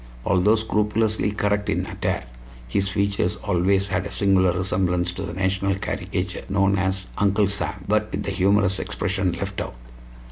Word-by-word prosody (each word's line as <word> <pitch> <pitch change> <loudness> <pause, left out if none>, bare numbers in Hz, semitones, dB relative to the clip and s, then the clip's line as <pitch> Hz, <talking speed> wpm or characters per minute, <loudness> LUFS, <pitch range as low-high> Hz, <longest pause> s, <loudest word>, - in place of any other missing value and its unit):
Although 100 +3 +4
scrupulously 105 -1 +1
correct 105 0 0
in - - 0
attire, - - -2 0.4
his 95 +10 0
features 100 -2 0
always 95 +1 +1
had 95 +2 -1
a - - -9
singular 95 -2 +3
resemblance 90 -1 0
to 95 - -7
the 85 -3 -4
national 95 +1 0
caricature 95 -2 -3
known 100 0 +2
as 95 0 -1
"Uncle 100 0 +3
Sam," 100 -1 -3
but 105 +1 +1
with 100 - -3
the 100 - -2
humorous 95 0 +2
expression 95 0 -1
left 85 - -4
out. - - -6
95 Hz, 155 wpm, -23 LUFS, 95-100 Hz, 0.4 s, Although